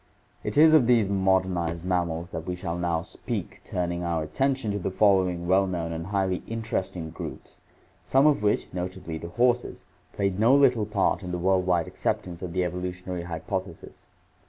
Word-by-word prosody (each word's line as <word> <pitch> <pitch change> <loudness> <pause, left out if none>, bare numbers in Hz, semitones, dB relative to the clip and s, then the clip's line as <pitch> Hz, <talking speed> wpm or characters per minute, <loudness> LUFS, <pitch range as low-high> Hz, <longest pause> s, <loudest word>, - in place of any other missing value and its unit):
It - - -3
is 155 +1 +7
of 145 -7 +6
these 115 -5 +4
modernized 95 -3 +1
mammals 85 -2 -1
that 80 +2 -6
we 90 - -2
shall 90 -2 -4
now 85 -2 -1
speak, - - -6
turning 85 -1 -2
our 85 -2 -1
attention 130 - 0
to 100 - -2
the 95 - -2
following 95 -3 +2
well 95 +2 +4
known 85 -3 -3
and 85 +1 -5
highly 95 -2 0
interesting 95 -7 -3
groups, - - -9 0.4
some 135 +2 +3
of 150 -8 +4
which, 105 -2 0
notably 90 -3 -5
the 85 - -7
horses, 120 +5 +1 0.3
played 100 -1 -1
no 115 +5 +5
little 125 -7 +4
part 105 -1 +1
in 90 -2 -6
the 90 - -2
world 95 +1 +1
wide 85 -2 +2
acceptance 85 -2 -3
of 90 -2 -5
the 90 0 +1
evolutionary 90 0 -4
hypothesis. 85 +2 -6
90 Hz, 175 wpm, -26 LUFS, 85-105 Hz, 0.4 s, is